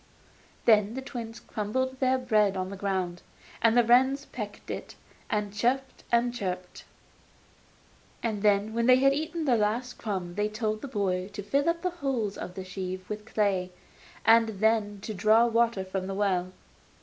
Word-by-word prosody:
Then 215 0 +4
the 265 - -3
twins 230 -4 -7
crumbled 260 +5 -3
their 260 0 +3
bread 215 -6 +2
on 185 0 -2
the - - -5
ground, 185 -3 -2 0.4
and 230 +1 +4
the 240 - +6
wrens 260 +4 +4
pecked 210 -3 -7
it, - - -6 0.3
and 205 -1 -1
chirruped 255 +5 -1
and 240 0 +3
chirped. 185 -5 -5 1.4
And 215 -3 -1 0.3
when 235 +1 +1
they 255 - +8
had 275 +1 +4
eaten 315 +2 -3
the 255 -4 +4
last 230 +4 -1
crumb 190 -5 -3
they 210 +3 0
told 215 0 -2
the - - -5
boy 190 -6 -1
to 205 - -5
fill 280 - +1
up 335 +1 -1
the 365 - 0
holes 235 -8 -1
of 180 - -7
the 190 - -6
sieve 185 0 -5
with 210 0 -5
clay, 195 -4 0 0.5
and 225 0 +6
then 215 -2 +1
to 215 - -5
draw 215 +4 +4
water 230 -4 +1
from 185 0 -3
the 195 - -4
well. 185 -3 0
215 Hz, 170 wpm, -28 LUFS, 195-245 Hz, 1.4 s, they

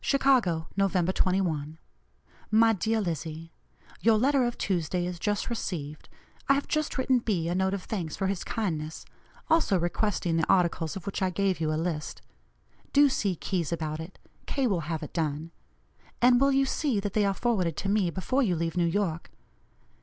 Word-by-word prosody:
"CHICAGO, 240 - +2
November 190 -2 +2
21. 165 -6 0 0.7
"MY 225 +1 +5
DEAR 220 +3 0
LIZZIE: 165 -2 -4 0.5
Your 225 -1 +4
letter 265 +2 +3
of 240 - -2
Tuesday 175 -1 -1
is 180 -1 -5
just 205 +3 -1
received. 155 -10 -5 0.4
I 275 - +6
have 280 - -2
just 305 -1 -1
written 260 -1 +3
B. 190 -8 -1
a 175 - 0
note 190 +1 +1
of 190 - -6
thanks 175 -8 -4
for 195 - -2
his 190 -2 -1
kindness; 160 -8 -3 0.4
also 320 - +3
requesting 175 0 0
the 165 - 0
articles 170 -4 +2
of 195 - -7
which 200 - -4
I 190 - +2
gave 190 0 0
you 155 -1 +1
a 155 - 0
list. 160 -2 -3 0.7
Do 285 0 +6
see 200 -8 0
Keyes 170 -1 -2
about 155 -2 -3
it; 165 +4 -8 0.3
K. 275 -2 0
will 175 -9 -1
have 160 -2 -2
it 150 - -8
done. 160 0 -2 0.7
And 245 +1 +5
will 275 0 +5
you 270 0 +3
see 270 -4 0
that 200 -1 -3
they 210 - +2
are 195 -1 +1
forwarded 185 -9 0
to 195 - -3
me 200 -3 +2
before 190 +10 0
you 195 -9 +2
leave 165 0 -2
New 175 -1 +2
York? 170 -2 -1
185 Hz, 185 wpm, -28 LUFS, 165-220 Hz, 0.7 s, I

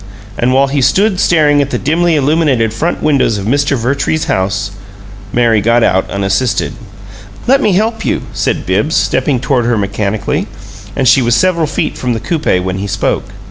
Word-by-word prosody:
And 125 +2 0
while 135 +2 +4
he 140 0 -1
stood 195 - +2
staring 150 -4 +3
at 140 - -2
the - - -2
dimly 165 +4 +1
illuminated 140 -6 +1
front 165 +10 -2
windows 140 -7 +2
of 100 - -5
Mr. 140 +4 +1
Vertrees's 140 +6 -1
house 95 +2 -1 0.6
Mary 115 -3 +2
got 115 +3 +2
out, 95 -2 +1
unassisted. 100 +5 -1 0.7
"Let 270 +2 +3
me 210 - +2
help 220 +4 0
you," - - -1
said - - -2
Bibbs, 105 - 0
stepping 130 0 +1
toward 130 -2 0
her 120 -1 +1
mechanically; 100 +1 -2 0.5
and 135 -2 0
she 135 - +5
was 120 -1 +2
several 170 +3 +1
feet 150 - -3
from 125 -1 -1
the 115 - -3
coupe 115 - -1
when 95 0 -3
he 100 - -3
spoke. - - -1
130 Hz, 180 wpm, -13 LUFS, 110-155 Hz, 0.7 s, she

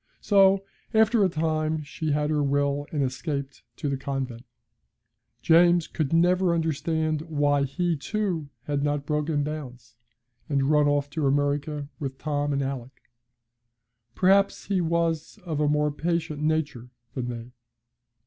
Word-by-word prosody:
So, 195 -1 +4 0.3
after 220 0 +4
a 190 - +3
time, 155 -1 -1
she 155 +2 -3
had 150 +1 +1
her 150 -1 +1
will 140 0 0
and 145 -3 0
escaped 140 +1 -4
to - - -4
the 140 -1 -1
convent. 130 -3 -4 1.0
James 170 0 +5
could 155 -5 -2
never 175 +1 +3
understand 160 -1 -1
why 145 -2 +2
he, 175 +5 -1
too, 175 -2 -2
had 145 0 -1
not 145 0 -1
broken 150 0 0
bounds, 125 -6 -7 0.5
and 140 0 +1
run 150 -1 +4
off 145 0 0
to 150 -2 0
America 145 +1 0
with 135 -3 -4
Tom 145 -1 -1
and 140 0 0
Alick. 130 -2 -7 1.0
Perhaps 195 +2 +3
he 195 -3 0
was 165 -1 -1
of 155 -4 -2
a 150 - +2
more 150 0 +2
patient 160 -1 -2
nature 150 -6 -1 0.2
than 125 -2 -3
they. 120 0 -6
150 Hz, 140 wpm, -26 LUFS, 140-165 Hz, 1.0 s, James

